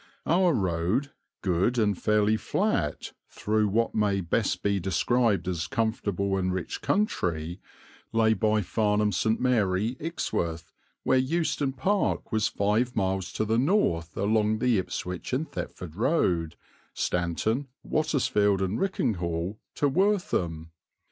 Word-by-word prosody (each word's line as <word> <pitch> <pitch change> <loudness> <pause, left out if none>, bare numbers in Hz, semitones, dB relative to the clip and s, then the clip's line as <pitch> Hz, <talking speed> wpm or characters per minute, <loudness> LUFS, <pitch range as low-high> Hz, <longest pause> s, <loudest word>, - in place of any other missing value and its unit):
Our 175 +2 +3
road, 95 +9 0 0.3
good 95 +6 +1
and 105 -3 +2
fairly 105 +2 +2
flat, - - -1 0.2
through 110 0 0
what 115 +3 +1
may 105 -2 +1
best 95 +4 -1
be 100 -1 +1
described 105 +3 +1
as 85 -3 -2
comfortable 100 -4 -1
and 95 0 0
rich 90 -1 -4
country, 85 - -1 0.5
lay 115 -1 +3
by 110 -1 +1
Farnham 105 +1 +1
St. 110 +2 +1
Mary, 110 -2 +1
Ixworth, 85 - -3 0.3
where 130 - +3
Euston 145 -1 0
Park 190 +10 0
was 110 -1 +2
five 110 +5 0
miles 95 -2 -1
to 110 - -1
the 110 +2 +1
north 120 - +1
along 105 +1 +2
the 115 -2 +2
Ipswich 90 +2 -5
and 150 +5 0
Thetford 85 -4 -6
Road, 90 - +1 0.4
Stanton, 100 +10 -1 0.2
Wattisfield, 105 -10 +2
and 95 +2 -1
Richinghall 95 - -1 0.2
to 145 - +2
Wortham. 135 - 0
105 Hz, 125 wpm, -27 LUFS, 95-125 Hz, 0.5 s, Our